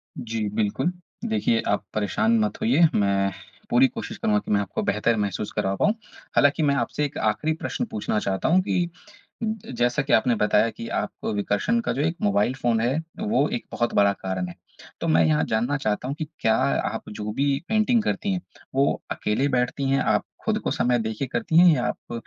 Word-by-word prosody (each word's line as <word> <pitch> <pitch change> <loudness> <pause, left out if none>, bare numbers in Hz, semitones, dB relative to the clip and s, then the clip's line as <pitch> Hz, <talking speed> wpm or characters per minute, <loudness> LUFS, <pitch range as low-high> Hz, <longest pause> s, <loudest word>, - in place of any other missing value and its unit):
जी, 110 -2 -3
बिल्कुल। 110 - 0 0.4
देखिए 110 +1 +1
आप 105 - +1
परेशान 220 - +1
मत 215 -2 0
होइए, 220 -7 +5
मैं 100 -1 +2 0.4
पूरी 260 +2 +5
कोशिश 230 -3 -7
करूँगा 215 -2 +2
की - - -7
मैं 105 - +4
आपको 100 0 -3
बेहतर 105 +3 +1
महसूस 100 +1 -2
करा 105 -3 -1
पाऊँ, 205 - +2 0.4
हालाँकि 145 +3 +4
मैं 140 -1 +3
आपसे 145 +1 -1
एक 145 - -6
आख़िरी 160 +1 0
प्रश्न 245 - -3
पूछना 105 0 -1
चाहता 95 +3 -1
हूँ 180 +3 +5
कि 175 -2 0 0.8
जैसा 120 +3 +1
कि 140 - -2
आपने 120 +2 +4
बताया 105 +1 +3
कि 115 - -8
आपको - - -4
विकर्षण 105 - 0
का - - -1
जो 140 - -1
एक 160 +2 0
मोबाइल 105 +4 +2
फ़ोन 120 -4 +1
है, 125 +6 +1 0.2
वो 215 +1 +2
एक 240 +1 -3
बहुत 120 0 -1
बड़ा 100 0 +4
कारण 95 -2 -4
है। 85 - -8 0.5
तो - - -2
मैं 80 +1 +4
यहाँ 75 -1 +2
जानना 120 +6 0
चाहता 110 -2 -2
हूँ 140 - -2
कि 155 - -2 0.2
क्या 110 - +3
आप - - -1
जो 105 0 -5
भी 140 +1 +1
पेंटिंग 220 +2 +3
करती 205 -2 -1
हैं, 185 - -1 0.3
वो 140 +1 +1
अकेले 120 +7 0
बैठती 130 +1 0
हैं, 135 - +3
आप - - +1 0.2
खुद - - +1
को - - 0
समय 120 0 +1
देके 110 +3 -2
करती 165 - +1
हैं 180 +1 +8
या 125 -4 -1
आप - - -5
120 Hz, 200 wpm, -24 LUFS, 105-160 Hz, 0.8 s, हैं